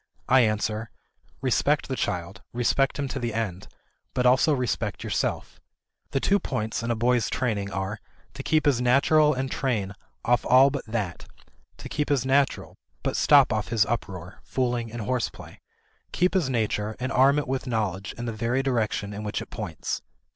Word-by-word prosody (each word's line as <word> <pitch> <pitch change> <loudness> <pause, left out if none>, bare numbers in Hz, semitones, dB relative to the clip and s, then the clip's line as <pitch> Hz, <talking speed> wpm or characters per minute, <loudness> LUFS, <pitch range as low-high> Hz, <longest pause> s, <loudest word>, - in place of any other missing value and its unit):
I 130 - +6
answer, 110 -1 0 0.5
Respect 140 +3 +1
the 130 - -2
child, 90 -2 -3
respect 125 +3 +1
him 140 -1 -2
to 135 - -3
the 120 -3 -3
end, 100 -5 -3 0.5
but 125 - +1
also 130 +5 +5
respect 125 -5 -1
yourself.... - - -2 0.5
The 135 - 0
two 200 +8 +2
points 110 - -3
in 115 - -3
a 115 - +1
boy's 120 -1 +2
training 105 -5 -1
are, 95 +2 -3 0.3
to - - -6
keep 155 0 +1
his 135 -4 +3
naturel 150 +4 +4
and 130 0 -3
train 110 -8 -1 0.3
off 120 0 +3
all 130 +2 +6
but 140 -3 -5
that; 105 -6 -3 0.5
to - - -8
keep 150 -1 -2
his 135 -4 +1
naturel, 135 +1 +1 0.3
but - - -1
stop - - +5
off - - -1
his 115 -2 +2
uproar, 95 -6 -5
fooling, 120 -3 -2
and 120 0 -5
horseplay; 125 +2 -3 0.5
keep 180 +1 +2
his 180 -8 +1
nature 110 -3 -1
and 130 +1 -2
arm 135 +3 +5
it 145 - -1
with 135 +1 -2
knowledge 100 -5 -2
in 120 - -4
the 115 - -3
very 120 +4 0
direction 110 -5 -1
in 105 - -5
which 105 -1 -3
it - - -9
points." - - -4
120 Hz, 175 wpm, -26 LUFS, 110-135 Hz, 0.5 s, I